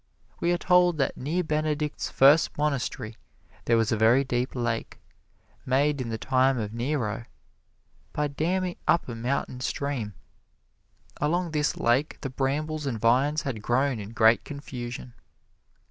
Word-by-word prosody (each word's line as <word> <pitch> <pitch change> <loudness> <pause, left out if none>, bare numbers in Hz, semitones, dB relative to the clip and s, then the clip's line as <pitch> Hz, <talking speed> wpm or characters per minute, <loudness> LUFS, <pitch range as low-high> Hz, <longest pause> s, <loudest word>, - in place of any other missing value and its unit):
We 170 - +1
are 175 - +2
told 180 -1 +3
that 135 -2 0
near 160 +7 -1
Benedict's 150 -1 -1
first 145 +4 +5
monastery 135 -6 -2 0.5
there 115 - +3
was 115 0 +1
a - - +3
very 115 +5 +4
deep 125 -1 -2
lake, 120 -2 -3 0.6
made 140 +2 +1
in 120 - -4
the 110 - -3
time 130 +2 +2
of 105 -2 -3
Nero 120 -3 -2 0.9
by 150 0 -1
damming 175 +5 -1
up 170 - +3
a 120 - -5
mountain 125 +2 -2
stream. 125 -6 -3 1.0
Along 170 +3 0
this 150 -1 0
lake 125 +6 +1
the 135 - -4
brambles 150 +3 -2
and 115 -5 -2
vines 135 +7 +2
had 120 -6 -4
grown 130 +2 +1
in 100 -1 -7
great 115 0 +4
confusion. 125 -4 -7
135 Hz, 145 wpm, -26 LUFS, 120-150 Hz, 1.0 s, first